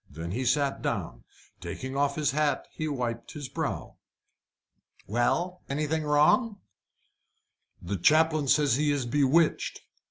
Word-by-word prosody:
Then 85 +1 -6
he 125 +6 -2
sat 140 +2 +1
down. - - -4 0.3
Taking 130 +1 -6
off 140 0 +1
his 150 -4 +1
hat, 145 -1 0
he 155 - -4
wiped 120 -5 -4
his 145 -3 -6
brow. - - -4 1.1
"Well? 175 - 0
Anything 155 +2 -1
wrong?" 155 +9 +3 1.2
"The 95 +3 -4
chaplain 155 - +3
says 140 -2 +3
he 150 0 +2
is 140 -3 -1
bewitched." 145 +5 +2
145 Hz, 125 wpm, -28 LUFS, 130-155 Hz, 1.2 s, wrong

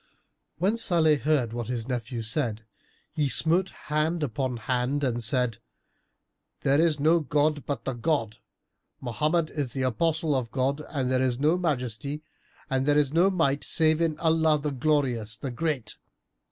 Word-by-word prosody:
When 200 +6 +1
Salih 165 -9 +3
heard 135 -6 +1
what 120 -2 -4
his 120 -2 -3
nephew 120 -2 -3
said, 115 -2 0 0.5
he 150 -3 0
smote 175 +7 +2
hand 155 +2 -2
upon 130 -1 -2
hand 125 +5 -1
and 120 -3 -1
said, 125 -1 0 1.0
"There 140 +3 +3
is 160 -3 +2
no 160 +4 +4
god 150 -1 0
but 140 -6 -3
the 135 - -1
God! 120 -4 -1 0.6
Mohammed 155 +7 0
is 140 -6 -3
the 130 - -2
Apostle 160 +5 +1
of 125 -3 -1
God 135 +4 -1
and 130 -4 -1
there 130 0 +2
is 125 -2 +1
no 150 +5 +3
Majesty 145 -3 -2 0.4
and 135 0 -1
there 145 0 +4
is 145 -1 +2
no 175 +4 +4
Might 155 -7 +1
save 160 0 +2
in 160 -2 +1
Allah, 160 -1 +3
the 145 0 -2
Glorious, 125 -6 0
the 135 +1 -5
Great!" 130 -4 -3
145 Hz, 160 wpm, -27 LUFS, 125-155 Hz, 1.0 s, no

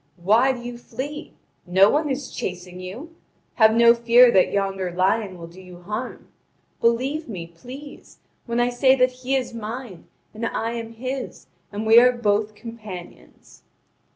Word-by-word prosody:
Why 220 +9 +3
do 255 - -5
you 240 0 -7
flee? 275 +6 -7 0.3
No 190 +2 +5
one 300 0 0
is 270 0 -4
chasing 180 0 -6
you. 240 - -9 0.4
Have 220 -2 +5
no 235 0 +7
fear 235 +1 +6
that 190 -4 +3
yonder 195 -2 -1
lion 190 +2 0
will 170 - -9
do 170 +3 -14
you 180 -1 -14
harm. 215 +7 -6 0.5
Believe 260 +6 0
me, 180 -6 -6
please, 250 - -12 0.3
when 235 0 -1
I 240 0 +2
say 260 +2 +4
that 255 -1 +3
he 255 +1 -3
is 255 -3 -2
mine, 225 -3 -7 0.3
and 220 +2 -8
I 230 0 -3
am 230 -1 -6
his, 255 +3 -6 0.3
and 210 +1 -4
we 225 +1 +8
are 250 +1 +6
both 215 -3 0
companions." 215 -6 -11
230 Hz, 160 wpm, -23 LUFS, 195-250 Hz, 0.5 s, we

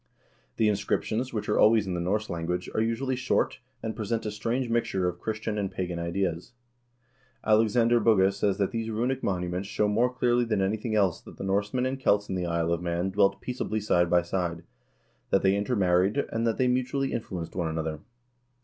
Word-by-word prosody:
The 110 - +3
inscriptions, 110 +4 -1
which 110 -3 -3
are 105 - +1
always 110 -1 +5
in 95 - -3
the 90 - -2
Norse 105 +5 -1
language, 85 +1 -3
are - - +1
usually 115 +4 0
short, 125 0 0 0.2
and 110 -1 -3
present 110 +1 -2
a 105 - -2
strange 115 +5 -2
mixture 115 -6 0
of 90 0 -3
Christian 110 0 -3
and 100 -2 -1
pagan 90 -2 -4
ideas.2 120 +9 -7
Alexander 115 +2 +4
Bugge 100 -4 +4
says 100 -1 0
that 100 -2 0
these 115 -1 -3
runic 125 +4 -1
monuments 90 0 -2
show 105 - +1
more 115 +4 +2
clearly 120 -1 +2
than 115 -4 0
anything 110 +3 -1
else 95 -5 +2
that - - -13
the - - -6
Norsemen 105 +6 0
and 130 +1 -2
Celts 100 -5 +2
in - - -2
the 90 -2 -2
Isle 85 0 0
of 85 - -2
Man 85 +2 -1
dwelt 100 0 +2
peaceably 125 -3 -2
side 90 -4 +2
by 85 0 +4
side, 85 -1 -2 0.7
that 95 - +2
they 95 0 +4
intermarried, 100 -1 +2
and 115 +1 0
that 115 - 0
they 130 - +2
mutually 130 +2 0
influ 95 -6 -4
enced - - -17
one 85 -3 -1
another. 80 -1 -3
105 Hz, 195 wpm, -27 LUFS, 90-115 Hz, 0.7 s, always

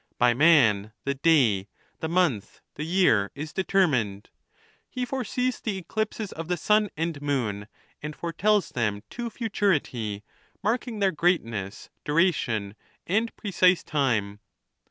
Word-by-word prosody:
By 125 -1 +4
man 120 -8 +4
the 140 - 0
day, 130 -10 +3 0.3
the 160 - -2
month, 165 - 0
the 150 - -5
year, 155 - +3
is 150 +2 -6
deter 190 0 +3
mined. 110 - -2 0.6
He 250 -1 -3
foresees 255 0 -2
the 210 -4 -2
eclipses 215 +3 -3
of 165 0 -6
the 180 0 -1
sun 210 +5 +2
and 165 -2 -2
moon, 115 -8 -2 0.3
and 150 0 -6
foretells 195 +5 +1
them 105 -4 -2
to 240 -1 -4
futurity, 150 - -1 0.4
marking 225 0 -1
their 195 -1 +3
greatness, 115 - -1
dura^ 170 +5 +3
tion, 110 -8 -3 0.3
and 220 +5 0
precise 185 -3 +2
time. 110 -9 0
160 Hz, 135 wpm, -26 LUFS, -, 0.6 s, By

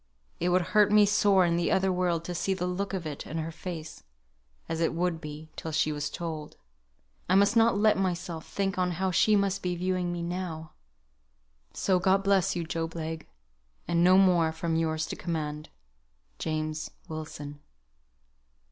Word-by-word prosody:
It 175 - +1
would 180 0 +3
hurt 210 -1 +5
me 210 0 +7
sore 200 -2 +4
in 170 0 +1
the 170 - 0
other 190 0 +2
world 175 -2 0
to 180 - -4
see 190 +3 -1
the 180 -1 -2
look 185 +2 -2
of 190 -4 -4
it 150 -2 -6
in 160 - -5
her 160 0 -3
face, 165 -1 -7 0.7
as 165 0 -3
it 165 - +1
would 170 -1 -1
be, 155 0 -8
till 160 - -5
she 155 0 +1
was 145 0 -3
told. 160 -2 -6 0.7
I 185 - +4
must 200 +3 +4
not 225 -2 +4
let 210 -1 +3
myself 175 -3 -2
think 195 -1 -2
on 180 -1 +1
how 190 +2 -1
she 210 +4 +4
must 200 -1 +1
be 180 -1 -1
viewing 180 0 -1
me 175 -1 -3
now. 170 -3 -4 1.0
So 185 -2 +2
God 190 +1 +3
bless 195 -3 +2
you, 175 - -1
Job 165 0 -4
Legh; 160 0 -5 0.6
and 170 0 +2
no 185 +1 +6
more 175 -4 +4
from 160 +1 -2
Yours 160 -1 0
to - - -5
command, 155 -3 -4 0.7
JAMES 155 0 -3 0.2
WILSON. 150 -2 -7
175 Hz, 175 wpm, -28 LUFS, 160-190 Hz, 1.0 s, me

